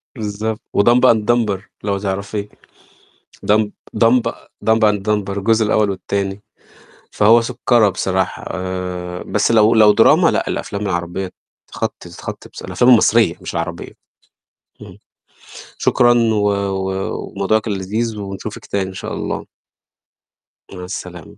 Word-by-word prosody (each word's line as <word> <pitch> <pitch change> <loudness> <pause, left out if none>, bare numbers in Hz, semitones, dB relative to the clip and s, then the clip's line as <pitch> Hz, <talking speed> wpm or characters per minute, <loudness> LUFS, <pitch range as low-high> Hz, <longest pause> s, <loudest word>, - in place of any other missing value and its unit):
بالضبط 110 -1 -4 0.2
وdumb 120 +4 +5
and 110 -2 0
dumber 110 -5 +1 0.2
لو 100 -1 -1
تعرفيه 100 +1 -4 1.0
dumb 105 0 +3 0.3
dumb 120 +2 +5 0.4
dumb 110 0 +4
and 105 -1 0
dumber 100 -2 -1
الجزء 110 +2 +2
الأول 105 -1 +2
والتاني، 100 +1 -3 0.7
فهو 115 +3 +5
سُكّرة 120 -2 +2
بصراحة، 95 -1 -2
آآ 90 0 -4
بس 105 +3 0
لو 110 0 +5
لو 105 -2 +7
دراما، - - +5
لأ - - -1
الأفلام 100 0 -4
العربية 90 -1 -3 0.4
تخطي - - -5
ذ - - -13
تخطي - - -8
بص - - -11
الأفلام 125 +1 +2
المصرية 115 -5 +5
مش - - -7
العربية، 85 0 -4 0.9
اهم. - - -12 0.8
شكرًا 120 -1 +3
و 110 -3 +2
و 95 -1 -2 0.2
وموضوع 100 +3 +1
كان 110 -1 -4
لذيذ 110 +4 -3
ونشوفِك 100 +2 -7
تاني 95 -2 -2
إن 95 - -9
شاء - - -6
الله. - - -4 1.3
مع 90 - -8
السلامة 90 -3 -8
100 Hz, 130 wpm, -18 LUFS, 95-110 Hz, 1.3 s, لو